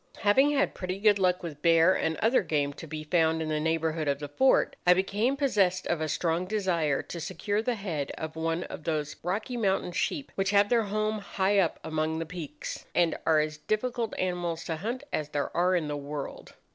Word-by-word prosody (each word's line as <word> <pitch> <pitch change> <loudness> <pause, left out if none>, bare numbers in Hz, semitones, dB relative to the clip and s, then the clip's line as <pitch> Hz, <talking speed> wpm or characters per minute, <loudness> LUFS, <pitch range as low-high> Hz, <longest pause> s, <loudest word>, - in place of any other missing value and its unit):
"Having 230 +7 +5
had 280 -1 +1
pretty 185 0 -4
good 205 0 +4
luck 180 -1 +2
with 150 -4 -7
bear 165 +2 +5
and 160 -3 -1
other 230 +4 +3
game 145 -4 0
to 165 - -10
be 155 0 -5
found 160 0 +2
in 160 -1 -2
the 155 -1 0
neighbourhood 160 0 0
of 140 -1 +1
the 145 0 -6
fort, 260 - +3
I 180 - +8
became 210 +8 0
possessed 205 -10 +2
of 170 -2 -1
a 155 - -1
strong 170 +3 0
desire 175 -8 0
to 170 - -7
secure 190 +5 -2
the 240 +1 -1
head 170 -9 -3
of 160 0 -5
one 165 +2 -1
of - - -8
those 150 -2 -2
Rocky 210 +8 -2
Mountain 195 -5 0
sheep 275 - -2
which 195 0 0
have 200 0 +4
their 235 -3 +3
home 215 +1 -1
high 200 0 +1
up 170 -4 +1
among 160 0 -1
the 165 - -3
peaks, 155 -3 -7
and 170 -2 +3
are 160 -1 +5
as 155 0 -3
difficult 230 +4 -2
animals 175 -2 -2
to 160 - -3
hunt 235 - -4
as 150 -1 -1
there 145 -1 -3
are 180 +2 +3
in 165 -4 0
the 145 - -2
world. 145 0 -7
175 Hz, 210 wpm, -28 LUFS, 155-205 Hz, -, I